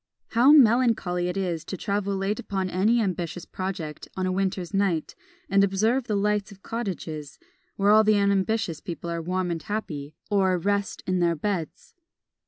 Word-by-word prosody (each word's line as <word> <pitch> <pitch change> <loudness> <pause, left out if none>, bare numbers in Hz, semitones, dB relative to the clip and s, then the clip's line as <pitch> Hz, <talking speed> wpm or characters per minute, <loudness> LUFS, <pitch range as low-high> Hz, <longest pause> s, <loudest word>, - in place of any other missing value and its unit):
"How 250 +4 +5
melancholy 230 -10 +4
is 180 -3 -2
it - - -19
to 190 - -4
travel 200 0 -1
late 195 +2 -1
upon 190 -2 -3
any 215 +6 +3
ambitious 180 -4 -2
project 180 -5 -5
on 185 - 0
a 185 - 0
winter's 185 -1 -2
night, 195 -5 0 0.3
and 195 +1 +4
observe 220 +6 +1
the 210 - 0
light 210 0 0
of 195 -1 -15
cottages, 165 -10 -5 0.4
where 200 +1 +3
all 215 +1 +7
the 215 -1 +4
unambitious 200 -2 +1
people 170 -1 -5
are 170 0 -2
warm 180 +1 -1
and 165 -1 -3
happy, 155 -7 -5 0.2
or 190 -2 +3
at 175 - -5
rest 200 0 -1
in 185 -1 0
their 170 -1 +2
beds." 170 -1 -4
195 Hz, 175 wpm, -26 LUFS, 175-210 Hz, 0.4 s, all